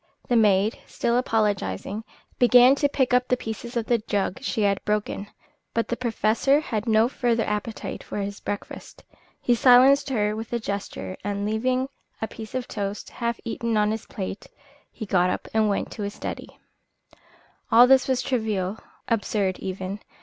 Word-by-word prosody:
The 245 Hz, -, +3 dB
maid, 210 Hz, -1 st, +3 dB
still 235 Hz, -, -1 dB
apologising, 210 Hz, -, 0 dB, 0.4 s
began 245 Hz, +1 st, +7 dB
to 285 Hz, +1 st, +1 dB
pick 260 Hz, -3 st, +1 dB
up 250 Hz, 0 st, +3 dB
the 250 Hz, -, +2 dB
pieces 235 Hz, +2 st, -6 dB
of 230 Hz, -, -1 dB
the 235 Hz, 0 st, +2 dB
jug 205 Hz, +1 st, -2 dB
she 230 Hz, -5 st, -1 dB
had 200 Hz, -1 st, +1 dB
broken; 210 Hz, -1 st, -2 dB, 0.5 s
but 230 Hz, -, +1 dB
the 240 Hz, -, 0 dB
Professor 240 Hz, +3 st, +2 dB
had 230 Hz, -7 st, -3 dB
no 220 Hz, +1 st, +4 dB
further 240 Hz, -3 st, 0 dB
appetite 210 Hz, +1 st, -4 dB
for -, -, -6 dB
his 200 Hz, 0 st, -4 dB
breakfast. 205 Hz, -, -7 dB, 0.4 s
He 245 Hz, -, +2 dB
silenced 265 Hz, +4 st, +6 dB
her 210 Hz, -4 st, 0 dB
with 225 Hz, +1 st, -6 dB
a 235 Hz, -, +1 dB
gesture, 200 Hz, -3 st, -5 dB
and, 200 Hz, 0 st, -2 dB
leaving 255 Hz, +5 st, 0 dB, 0.3 s
a 220 Hz, -, -2 dB
piece 220 Hz, +2 st, -9 dB
of 255 Hz, -2 st, -2 dB
toast 205 Hz, 0 st, -4 dB
half 235 Hz, -1 st, -3 dB
eaten 230 Hz, -1 st, -1 dB
on 210 Hz, 0 st, +2 dB
his 220 Hz, 0 st, -5 dB
plate, 195 Hz, 0 st, -6 dB, 0.4 s
he 220 Hz, -, -7 dB
got 180 Hz, -2 st, +2 dB
up -, -, -3 dB
and 220 Hz, -1 st, +3 dB
went 200 Hz, -, -1 dB
into -, -, -8 dB
his 200 Hz, 0 st, -4 dB
study. -, -, -7 dB, 1.1 s
All 235 Hz, +2 st, +9 dB
this 265 Hz, 0 st, +5 dB
was 260 Hz, -1 st, +1 dB
trivial, 215 Hz, -5 st, -1 dB, 0.3 s
absurd 205 Hz, -4 st, 0 dB
even. 190 Hz, +1 st, -5 dB
220 Hz, 170 wpm, -25 LUFS, 205-245 Hz, 1.1 s, All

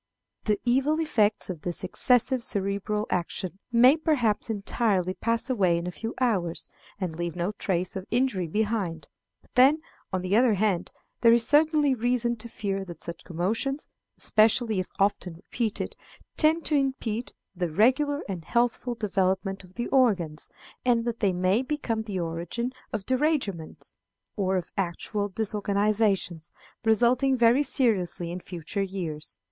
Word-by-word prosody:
The 210 Hz, -2 st, +1 dB
evil 270 Hz, +6 st, +2 dB
effects 220 Hz, -10 st, +1 dB
of 165 Hz, -4 st, -8 dB
this 175 Hz, +2 st, -3 dB
excessive 250 Hz, +6 st, +2 dB
cerebral 200 Hz, 0 st, -1 dB
action 180 Hz, +1 st, -2 dB
may 245 Hz, +4 st, +7 dB
perhaps 250 Hz, -10 st, +1 dB
entirely 200 Hz, -3 st, 0 dB
pass 230 Hz, +5 st, 0 dB
away 190 Hz, -10 st, +2 dB
in 170 Hz, -, -3 dB
a 180 Hz, -, -3 dB
few 225 Hz, +5 st, -6 dB
hours, 195 Hz, -10 st, 0 dB, 0.3 s
and 180 Hz, -5 st, -3 dB
leave 170 Hz, 0 st, -3 dB
no 175 Hz, +3 st, -1 dB
trace 185 Hz, -3 st, -2 dB
of 190 Hz, 0 st, -5 dB
injury 235 Hz, -7 st, +1 dB
behind; 195 Hz, -5 st, -1 dB, 0.4 s
but -, -, -28 dB
then, 270 Hz, +5 st, +6 dB, 0.3 s
on 185 Hz, -2 st, -1 dB
the 185 Hz, +2 st, +1 dB
other 235 Hz, -2 st, +4 dB
hand, 195 Hz, -3 st, 0 dB, 0.3 s
there 230 Hz, -, +6 dB
is 230 Hz, 0 st, +4 dB
certainly 300 Hz, -1 st, +4 dB
reason 240 Hz, 0 st, 0 dB
to 235 Hz, +2 st, -8 dB
fear 195 Hz, -3 st, -3 dB
that 175 Hz, -4 st, -8 dB
such 170 Hz, 0 st, -7 dB
commotions, 220 Hz, -, -2 dB, 0.3 s
especially 220 Hz, -1 st, +3 dB
if 185 Hz, -, -2 dB
often 195 Hz, -3 st, 0 dB
repeated, 215 Hz, +5 st, -3 dB, 0.4 s
tend 320 Hz, +1 st, +3 dB
to 305 Hz, -, +1 dB
impede 260 Hz, -5 st, -1 dB, 0.2 s
the 175 Hz, -1 st, -1 dB
regular 260 Hz, -, +2 dB
and 180 Hz, -5 st, -5 dB
healthful 240 Hz, +2 st, 0 dB
development 195 Hz, -2 st, -1 dB
of 185 Hz, 0 st, -17 dB
the 240 Hz, -, -2 dB
organs, 195 Hz, -, +1 dB, 0.3 s
and 240 Hz, -2 st, +3 dB
that 235 Hz, -1 st, -2 dB
they 200 Hz, -4 st, +2 dB
may 185 Hz, +5 st, +2 dB
become 260 Hz, -5 st, -2 dB
the 205 Hz, -4 st, -4 dB
origin 170 Hz, +9 st, -3 dB, 0.2 s
of 210 Hz, -3 st, -4 dB
derangements, 255 Hz, -, -1 dB, 0.4 s
or 190 Hz, -2 st, +1 dB
of 175 Hz, -, -5 dB
actual 200 Hz, +3 st, -2 dB
disorganizations, 205 Hz, -4 st, 0 dB, 0.3 s
resulting 245 Hz, +4 st, +3 dB
very 240 Hz, +3 st, +5 dB
seriously 205 Hz, -, +1 dB
in 180 Hz, -, -4 dB
future 180 Hz, +2 st, -5 dB
years. 165 Hz, -, -4 dB
210 Hz, 150 wpm, -27 LUFS, 185-245 Hz, 0.4 s, may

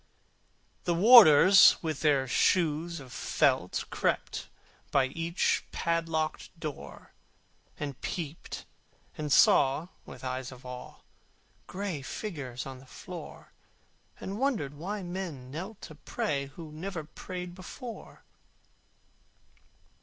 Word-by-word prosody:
The 175 Hz, -, +1 dB
warders 195 Hz, -, +9 dB
with 155 Hz, -3 st, -2 dB
their 140 Hz, -4 st, +2 dB
shoes 170 Hz, +3 st, +1 dB
of 130 Hz, -3 st, -11 dB
felt -, -, +1 dB
Crept -, -, -1 dB, 0.4 s
by 135 Hz, -2 st, +3 dB
each 165 Hz, +4 st, 0 dB
padlocked 165 Hz, -2 st, -1 dB
door, 155 Hz, -4 st, -8 dB, 0.7 s
And 140 Hz, -3 st, -5 dB
peeped 160 Hz, -3 st, -5 dB, 0.5 s
and 150 Hz, -1 st, -4 dB
saw, 140 Hz, +5 st, +5 dB
with -, -, -12 dB
eyes 130 Hz, 0 st, -4 dB
of 130 Hz, 0 st, -13 dB
awe, 125 Hz, 0 st, -9 dB, 0.7 s
Gray 185 Hz, -6 st, -4 dB
figures 135 Hz, -, -5 dB
on 130 Hz, -1 st, -8 dB
the 135 Hz, -, -17 dB
floor, -, -, -10 dB, 0.7 s
And 200 Hz, +3 st, -5 dB
wondered 235 Hz, -, 0 dB
why 190 Hz, +7 st, -5 dB
men 175 Hz, -8 st, -6 dB
knelt 190 Hz, +8 st, -7 dB
to -, -, -9 dB
pray 140 Hz, -2 st, -3 dB
Who 155 Hz, +2 st, -10 dB
never 165 Hz, +2 st, -5 dB
prayed 180 Hz, +3 st, -7 dB
before. 220 Hz, +6 st, -10 dB
160 Hz, 110 wpm, -29 LUFS, 140-180 Hz, 0.7 s, warders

